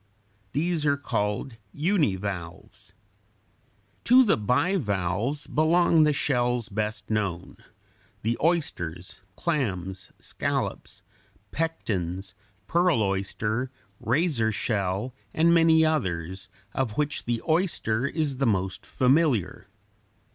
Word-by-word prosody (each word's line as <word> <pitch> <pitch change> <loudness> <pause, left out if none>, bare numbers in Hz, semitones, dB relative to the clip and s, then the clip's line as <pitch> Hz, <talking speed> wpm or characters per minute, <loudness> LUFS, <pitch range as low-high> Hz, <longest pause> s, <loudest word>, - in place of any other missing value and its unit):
These 165 +2 0
are 145 -1 +2
called 110 -2 -2
univalves. 100 - -2 1.1
To 255 +2 +7
the 215 - +3
bivalves 120 - 0
belong 165 +1 +3
the 150 - +4
shells 125 -5 0
best 105 +1 -3
known, 100 -5 -2 0.7
the 115 +2 +1
oysters, 90 - -1
clams, 95 - -2
scallops, - - -3 0.5
pectens, 95 - -3 0.3
pearl 170 - +2
oyster, 105 +5 -1 0.3
razor 125 -3 +1
shell, 105 +2 -1 0.2
and 165 +2 +4
many 165 -1 +5
others, 95 - -2 0.2
of 120 -5 -2
which 150 0 -1
the 120 -1 0
oyster 155 - +1
is 145 -3 -1
the 135 -1 +1
most 95 -3 -1
familiar. 130 - +1
120 Hz, 95 wpm, -26 LUFS, 100-155 Hz, 1.1 s, To